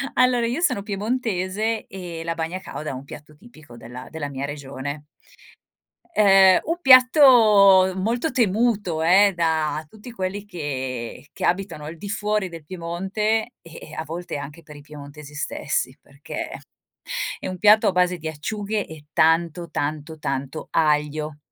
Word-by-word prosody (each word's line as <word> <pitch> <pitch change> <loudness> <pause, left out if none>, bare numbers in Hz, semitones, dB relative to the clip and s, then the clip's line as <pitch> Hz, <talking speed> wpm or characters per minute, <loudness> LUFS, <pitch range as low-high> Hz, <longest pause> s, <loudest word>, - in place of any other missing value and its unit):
allora 250 -2 +3
io 245 +8 -2
sono 275 - +1
piemontese 215 0 -2
e 175 -4 -7
la 165 0 -3
bagna 165 +3 -3
càuda 155 -4 -7
è - - -4
un 130 +1 -8
piatto 150 +2 -12
tipico 155 - -16
della 120 +2 -10
della 155 -3 -5
mia 140 0 -4
regione, 145 0 -6 1.1
ehm, 195 - +6
un 335 +2 -2
piatto 230 - +7
molto 235 +10 -1
temuto 210 -6 +1
eh, 195 +4 +5
da 160 -2 0
tutti 220 +6 -12
quelli 195 -1 -4
che 130 - -5
che - - -3
abitano 180 -4 -1
al 160 +2 -8
di 200 +5 -8
fuori 210 -1 -1
del 165 -2 -10
Piemonte 195 +7 -2
e 165 -1 -13
e - - -12
a 160 - -4
volte 170 0 -5
anche 145 +4 -9
per 150 0 -13
i - - -12
piemontesi 145 0 -12
stessi 140 -2 -2
perché 140 +1 -7 0.9
è - - -5
un 185 - -5
piatto 215 +1 +6
a - - +4
base 180 0 +2
di 160 -1 -6
acciughe 205 +7 -3
e 155 -2 -12
tanto, 165 +1 +2
tanto, 150 +2 -4
tanto 140 +1 -4
aglio. 150 -1 0
170 Hz, 155 wpm, -23 LUFS, 150-210 Hz, 1.1 s, piatto